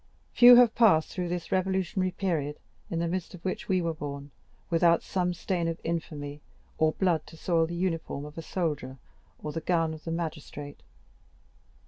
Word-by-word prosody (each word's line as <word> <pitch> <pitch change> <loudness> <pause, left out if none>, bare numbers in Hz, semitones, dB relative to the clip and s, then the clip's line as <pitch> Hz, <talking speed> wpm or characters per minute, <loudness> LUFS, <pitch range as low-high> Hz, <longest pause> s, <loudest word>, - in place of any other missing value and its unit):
Few 245 0 +9
have 240 -2 +6
passed 200 -10 +4
through 180 -2 -3
this 175 -1 -4
revolutionary 185 -1 0
period, 160 -6 -2 0.3
in 170 - -2
the 170 +1 0
midst 180 +1 -3
of 175 - -15
which 185 - -3
we 185 -2 +2
were 165 -1 -1
born, 145 -2 -7 0.4
without 170 0 +4
some 180 -1 0
stain 175 -1 -2
of 165 0 -3
infamy 150 -3 -4 0.4
or 155 0 +3
blood 175 -5 0
to 160 - -13
soil 165 0 +1
the 170 - -5
uniform 165 -5 -2
of 150 - -9
the 165 - -6
soldier, 150 -7 -3 0.5
or 150 - -3
the 165 - -4
gown 165 -2 +1
of 155 - -10
the 165 - -4
magistrate. 150 -3 -5
165 Hz, 175 wpm, -28 LUFS, 155-180 Hz, 0.5 s, Few